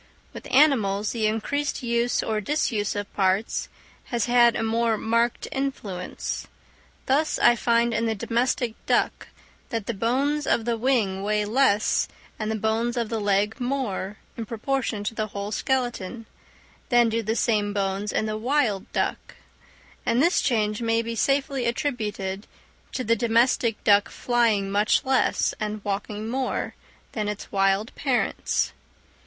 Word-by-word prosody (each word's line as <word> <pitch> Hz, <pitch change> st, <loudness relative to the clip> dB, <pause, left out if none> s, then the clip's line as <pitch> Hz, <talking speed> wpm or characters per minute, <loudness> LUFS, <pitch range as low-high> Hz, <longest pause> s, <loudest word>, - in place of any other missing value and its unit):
With -, -, -9 dB
animals 215 Hz, -8 st, +3 dB
the 220 Hz, -3 st, 0 dB
increased 280 Hz, +7 st, -2 dB
use 235 Hz, 0 st, +1 dB
or 215 Hz, -1 st, -1 dB
disuse 215 Hz, -6 st, 0 dB
of 205 Hz, 0 st, -5 dB
parts 195 Hz, +2 st, 0 dB, 0.4 s
has 235 Hz, -4 st, -1 dB
had 240 Hz, -1 st, +5 dB
a 225 Hz, -, -1 dB
more 225 Hz, 0 st, +1 dB
marked 230 Hz, +2 st, 0 dB
influence; 225 Hz, -10 st, -4 dB, 0.6 s
thus 295 Hz, +4 st, +2 dB
I 240 Hz, -, +5 dB
find 235 Hz, 0 st, +2 dB
in 230 Hz, +1 st, 0 dB
the 225 Hz, -, 0 dB
domestic 235 Hz, +2 st, 0 dB
duck -, -, +1 dB, 0.4 s
that 225 Hz, -3 st, -3 dB
the 235 Hz, -, -2 dB
bones 270 Hz, +8 st, 0 dB
of 225 Hz, -, +2 dB
the 235 Hz, -1 st, +1 dB
wing 225 Hz, -6 st, +1 dB
weigh 210 Hz, +1 st, 0 dB
less 215 Hz, -2 st, +2 dB, 0.3 s
and 215 Hz, -1 st, -2 dB
the 220 Hz, -, 0 dB
bones 220 Hz, +3 st, 0 dB
of 230 Hz, -2 st, -1 dB
the 225 Hz, -, -1 dB
leg 205 Hz, +3 st, +1 dB
more, 245 Hz, -6 st, -2 dB, 0.2 s
in 225 Hz, -2 st, -5 dB
proportion 230 Hz, -2 st, -2 dB
to 210 Hz, -, -2 dB
the 215 Hz, -1 st, -2 dB
whole 200 Hz, 0 st, -5 dB
skeleton, 240 Hz, -3 st, -2 dB, 0.6 s
than 240 Hz, -2 st, +5 dB
do 230 Hz, +1 st, 0 dB
the 220 Hz, +1 st, -1 dB
same 210 Hz, -3 st, +1 dB
bones 200 Hz, 0 st, -1 dB
in -, -, 0 dB
the 215 Hz, 0 st, -3 dB
wild 240 Hz, -5 st, 0 dB
duck; -, -, -2 dB, 0.7 s
and 235 Hz, +1 st, +1 dB
this 340 Hz, +6 st, +3 dB
change 215 Hz, -3 st, 0 dB
may 230 Hz, 0 st, +1 dB
be 230 Hz, 0 st, -4 dB
safely 275 Hz, 0 st, +1 dB
attributed 210 Hz, -7 st, -2 dB, 0.5 s
to 255 Hz, -, -2 dB
the 230 Hz, 0 st, +3 dB
domestic 230 Hz, 0 st, +2 dB
duck 205 Hz, +1 st, +4 dB
flying 225 Hz, -5 st, +1 dB
much 205 Hz, +5 st, +2 dB
less, 265 Hz, 0 st, +2 dB
and 215 Hz, -1 st, -4 dB
walking 205 Hz, +1 st, -3 dB
more, 260 Hz, +2 st, -2 dB, 0.4 s
than 215 Hz, -2 st, -2 dB
its 210 Hz, 0 st, -5 dB
wild 195 Hz, +2 st, +1 dB
parents. 265 Hz, -4 st, 0 dB
225 Hz, 150 wpm, -25 LUFS, 210-245 Hz, 0.7 s, had